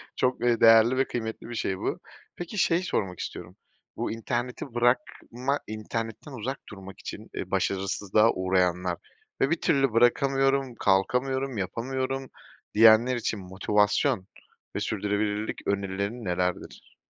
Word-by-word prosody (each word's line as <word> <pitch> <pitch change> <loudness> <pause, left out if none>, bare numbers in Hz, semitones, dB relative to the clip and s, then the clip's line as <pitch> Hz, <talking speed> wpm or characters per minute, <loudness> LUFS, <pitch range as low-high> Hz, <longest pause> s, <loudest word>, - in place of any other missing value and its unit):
çok, 125 -1 0
eee, 120 -2 +3
değerli 115 +3 +7
ve 135 - +3
kıymetli 110 0 -5
bir 120 - -5
şey 95 -3 -1
bu. - - -3 0.4
Peki 175 +4 -6
şeyi 175 0 +2
sormak 95 - -2
istiyorum. - - -7 0.4
Bu - - -2
interneti 120 +2 -3
bırakma, 125 +2 0
internetten 115 +5 -5
uzak 130 +2 -4
durmak 95 -2 -11
için, - - -8
eee, - - -5
başarısızlığa 100 +3 +2
uğrayanlar 90 -1 +1 0.4
ve 135 - +3
"Bir 165 - 0
türlü 135 -7 +2
bırakamıyorum, 135 +2 +2
kalkamıyorum, 125 +6 +1
yapamıyorum." 130 +7 -3 0.4
diyenler 115 +3 +6
için 110 -3 -2
motivasyon 100 0 +1 0.5
ve - - 0
sürdürülebilirlik 105 +1 -2
önerilerin 100 +3 -2
nelerdir? 90 0 -3
115 Hz, 125 wpm, -27 LUFS, 100-130 Hz, 0.5 s, değerli